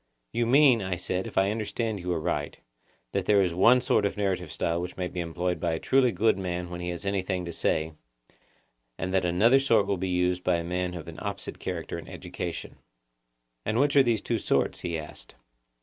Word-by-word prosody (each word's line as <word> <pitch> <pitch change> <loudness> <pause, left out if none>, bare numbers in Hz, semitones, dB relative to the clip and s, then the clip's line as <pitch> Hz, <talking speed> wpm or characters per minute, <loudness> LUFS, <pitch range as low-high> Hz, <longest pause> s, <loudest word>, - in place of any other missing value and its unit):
You 120 -1 +1
mean, 130 -2 +6
I 95 -2 -2
said, 90 +2 -3
if - - -9
I 95 +1 +3
understand 110 0 -2
you 90 0 -3
aright, 80 -3 -2 0.5
that - - -2
there 100 -2 +5
is 90 -2 -1
one 120 +8 +5
sort 125 -4 +2
of 100 - -1
narrative 95 -5 -1
style 85 +4 -1
which 90 +1 -6
may 90 -1 -1
be 90 - -6
employed 90 +1 -2
by 85 -2 0
a 80 - -2
truly 130 -2 +3
good 105 +1 +2
man 90 -1 -3
when 90 0 -5
he 90 - -3
has 85 +3 -5
anything 95 -2 -1
to 85 - -5
say, 80 0 0 1.0
and 95 0 -3
that 95 -1 +2
another 110 +10 +4
sort 115 -7 +3
will 100 -1 0
be 95 +1 -2
used 90 0 +1
by - - +2
a 85 - -1
man 90 +1 -2
of 85 -3 -7
an - - -8
opposite - - -5
character - - -4
and - - -11
education. - - -6 0.9
And 110 - -1
which 145 +1 +2
are 140 - +8
these 120 -5 +1
two 115 -2 -1
sorts? - - 0
he 85 -2 -3
asked. 75 -1 -9
95 Hz, 210 wpm, -27 LUFS, 90-110 Hz, 1.0 s, are